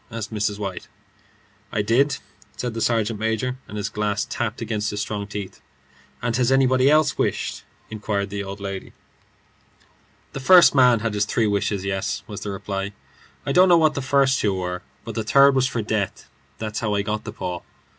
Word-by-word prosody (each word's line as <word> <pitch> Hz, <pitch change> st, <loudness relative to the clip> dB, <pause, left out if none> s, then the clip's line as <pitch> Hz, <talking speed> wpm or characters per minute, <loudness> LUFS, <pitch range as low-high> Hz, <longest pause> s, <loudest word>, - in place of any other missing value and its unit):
asked 110 Hz, -2 st, -6 dB
Mrs. 105 Hz, -1 st, -1 dB
White. 95 Hz, -3 st, -5 dB, 0.8 s
"I 105 Hz, -, 0 dB
did," 130 Hz, +7 st, +2 dB, 0.4 s
said 125 Hz, -2 st, -3 dB
the 115 Hz, -, -4 dB
sergeant 115 Hz, -2 st, +1 dB
major, 110 Hz, +4 st, -1 dB
and 105 Hz, -, -7 dB
his 100 Hz, -1 st, -2 dB
glass 105 Hz, 0 st, -1 dB
tapped 115 Hz, -1 st, -3 dB
against 110 Hz, -2 st, -2 dB
his 105 Hz, -, -4 dB
strong 105 Hz, -1 st, -3 dB
teeth. 105 Hz, -2 st, -7 dB, 0.6 s
"And 120 Hz, -2 st, 0 dB
has 125 Hz, 0 st, +2 dB
anybody 130 Hz, 0 st, +4 dB
else 155 Hz, 0 st, +3 dB
wished?" -, -, -1 dB, 0.3 s
persisted 100 Hz, -2 st, -2 dB
the 100 Hz, 0 st, -3 dB
old 100 Hz, +1 st, -7 dB
lady. 100 Hz, -1 st, -6 dB, 1.4 s
"The -, -, -4 dB
first 180 Hz, +6 st, +7 dB
man 125 Hz, -4 st, +5 dB
had 115 Hz, -1 st, -1 dB
his 105 Hz, 0 st, +1 dB
three 110 Hz, +1 st, +1 dB
wishes. 100 Hz, -1 st, 0 dB
Yes," 95 Hz, -1 st, -2 dB
was 105 Hz, -4 st, -7 dB
the 105 Hz, -, -4 dB
reply; 100 Hz, 0 st, -4 dB, 0.5 s
"I -, -, -1 dB
don't 185 Hz, +1 st, +6 dB
know 175 Hz, -, +7 dB
what 155 Hz, -2 st, +4 dB
the 140 Hz, -, -3 dB
first 135 Hz, 0 st, +3 dB
two 100 Hz, -2 st, +1 dB
were, 90 Hz, -1 st, -3 dB, 0.2 s
but 115 Hz, -, -5 dB
the 110 Hz, -, -2 dB
third 140 Hz, +5 st, +6 dB
was 130 Hz, -1 st, +2 dB
for 120 Hz, -4 st, -2 dB
death. 105 Hz, -2 st, -2 dB, 0.3 s
That's 110 Hz, -1 st, -4 dB
how 105 Hz, -2 st, -1 dB
I 100 Hz, -, +1 dB
got 105 Hz, +1 st, -3 dB
the 105 Hz, -, -6 dB
paw." 90 Hz, -5 st, -5 dB
110 Hz, 190 wpm, -23 LUFS, 100-125 Hz, 1.4 s, first